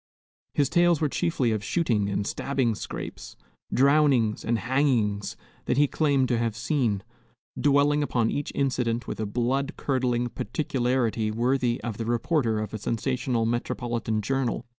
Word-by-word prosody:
His 140 - +3
tales 175 +1 +3
were 150 - +1
chiefly 140 -7 0
of 110 -2 -1
shooting 110 - +1
and 100 0 -1
stabbing 130 0 0
scrapes, - - -7 0.4
drownings 135 -5 +3
and 115 0 +1
hangings 115 -5 0 0.3
that - - 0
he 145 - +6
claimed 140 -3 +2
to 120 -2 +1
have 115 -2 -1
seen, 115 -5 0 0.5
dwelling 145 +1 +3
upon 120 -6 +1
each 145 - -3
incident 125 -4 0
with - - -5
a 110 - -1
blood 130 +7 -1
curdling 125 -3 0
particularity 120 -4 -1
worthy 120 +2 +1
of 115 -3 -4
the 115 - -3
reporter 120 0 +1
of 105 -1 -4
a 110 - -4
sensational 120 +1 -1
metropolitan 115 -2 -2
journal. 130 0 -1
120 Hz, 145 wpm, -26 LUFS, 115-140 Hz, 0.5 s, he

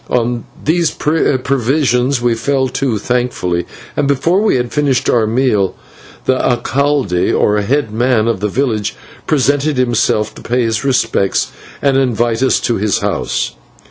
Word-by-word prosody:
On 120 -1 0 0.2
these 165 +1 +2
provisions 135 -3 +1
we 120 -1 +3
fell 130 +4 0
to 130 -3 -1
thankfully, 105 -7 -1 0.3
and, 145 - +1
before 165 +8 +2
we 215 - +2
had 125 -1 -1
finished 140 -4 +1
our 115 -2 +2
meal, 110 -5 +1 0.5
the 130 0 +2
/alcalde/, 130 -5 +1
or 105 0 +2
head 130 +2 0
man 120 -1 +2
of 115 -4 0
the 105 - -1
village, 110 -3 -1 0.3
presented 145 0 +1
himself 120 -3 +1
to - - -12
pay 125 +1 0
his 115 0 -1
respects 125 -7 +1 0.3
and 140 -1 +3
to 135 - +3
invite 120 -2 0
us 130 - +3
to 120 - 0
his 105 0 +1
house. - - -1
125 Hz, 150 wpm, -15 LUFS, 115-140 Hz, 0.5 s, we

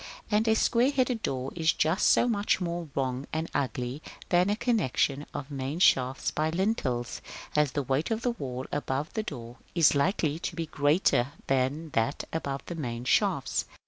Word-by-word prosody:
And 215 +2 +2
a 220 - +4
square 240 +3 +3
headed 255 -4 0
door 130 0 -2
is 160 -2 +2
just 160 +6 +2
so - - +5
much 205 -5 +1
more 170 -2 -3
wrong 130 0 -1
and 160 +1 -2
ugly 130 0 -2 0.3
than 180 +2 +4
a 205 - +2
connexion 150 - 0
of 145 +1 -6
main 135 +2 -3
shafts 130 -7 +3
by 155 +1 0
lintels, 160 - -1 0.3
as 150 -3 +3
the 145 - 0
weight 135 +4 0
of 225 +1 -2
wall 130 -1 -4
above 145 +1 -2
the 220 - 0
door 120 - -7 0.2
is 165 -4 +5
likely 155 0 +1
to 170 - -4
be 165 0 -2
greater 145 -3 +2
than 135 +4 0
that 115 +4 0
above 140 -4 -2
the - - -5
main 120 -7 -4
shafts. - - +1
150 Hz, 175 wpm, -28 LUFS, 130-180 Hz, 0.3 s, so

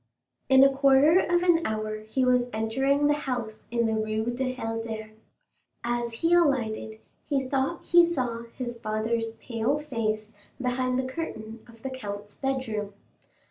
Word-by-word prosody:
In 265 0 +8
a 275 0 +5
quarter 275 +5 +6
of 350 -1 +2
an 340 -2 +4
hour 215 -2 -2
he 255 +4 0
was 250 -1 +3
entering 265 +6 +1
the 295 - +4
house 245 -7 -4
in 235 0 +1
the 220 - +1
Rue 220 +2 -1
du 255 0 -1
Helder. 225 -3 -4 0.7
As 240 0 -1
he 335 - +4
alighted, 240 -10 +1 0.3
he 275 -3 +1
thought 270 +5 -1
he 345 0 +7
saw 250 -9 -1
his 240 -2 -5
father's 225 +1 -1
pale 230 +4 -1
face 220 -7 -3 0.3
behind 255 0 0
the 260 - +1
curtain 230 -6 -5
of 230 -1 -17
the 265 - -3
count's 205 -5 -7
bedroom. 225 -7 -3
245 Hz, 150 wpm, -27 LUFS, 220-270 Hz, 0.7 s, In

